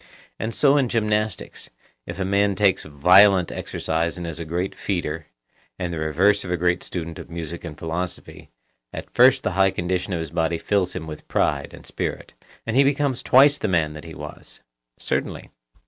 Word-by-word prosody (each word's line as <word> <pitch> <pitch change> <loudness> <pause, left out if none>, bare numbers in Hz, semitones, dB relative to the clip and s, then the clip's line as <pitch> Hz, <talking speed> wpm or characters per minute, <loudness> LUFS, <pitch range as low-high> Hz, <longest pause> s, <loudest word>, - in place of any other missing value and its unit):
And 110 +1 -3
so 145 0 +4
in 130 -4 +2
gymnastics, 105 -3 -1 0.4
if - - -6
a 95 - 0
man 100 +1 +2
takes 100 -3 +3
violent 90 +5 +5
exercise 80 +2 -2
and 85 - -5
is 80 -1 -6
a 85 - -5
great 90 +4 -2
feeder, 80 -5 -3 0.5
and 90 -1 -3
the 80 - -4
reverse 95 +7 +2
of 90 - -7
a 90 - 0
great 90 +1 +1
student 85 -2 -6
of - - -10
music 85 0 -6
and 80 -3 -8
philosophy, 85 +2 -5 0.4
at - - -8
first 125 +2 +5
the 110 - 0
high 95 +1 +3
condition 90 +1 -2
of 85 - -1
his 80 -2 -5
body 85 0 0
fills 100 +1 0
him 80 - -5
with 75 -1 -9
pride 70 -1 0
and - - -13
spirit, - - -5 0.3
and 115 - -2
he 135 - +6
becomes 140 -2 +1
twice 140 +3 +5
the - - -1
man 80 -5 +1
that 75 +1 -10
he 80 - -9
was. - - -10 0.4
Certainly. - - -3
90 Hz, 190 wpm, -23 LUFS, 80-105 Hz, 0.5 s, he